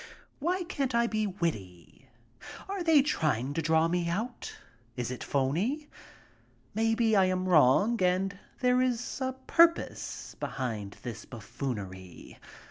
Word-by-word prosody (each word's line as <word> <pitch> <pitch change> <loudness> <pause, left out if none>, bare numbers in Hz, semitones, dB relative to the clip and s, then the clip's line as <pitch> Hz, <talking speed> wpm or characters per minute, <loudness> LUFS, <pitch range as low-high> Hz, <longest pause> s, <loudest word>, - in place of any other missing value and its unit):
Why 355 +5 0
can't 275 -8 -2
I 235 0 +4
be 215 -2 0
witty? 105 - -5 0.6
Are 390 -1 -3
they 320 -5 +5
trying 145 - 0
to 165 - -1
draw 160 +1 +3
me 170 0 0
out? 225 +8 -4 0.4
Is 125 -1 -3
it 125 - -5
phony? 185 - -1 0.8
Maybe 225 0 +2
I 195 -2 +5
am 185 0 0
wrong 185 - +4
and 190 +2 +1 0.2
there 250 0 +3
is 245 0 -1
a 260 0 -1
purpose 335 0 +2
behind 110 -7 -4
this 120 -3 -6
buffoonery. 105 - -7
185 Hz, 130 wpm, -29 LUFS, -, 0.8 s, they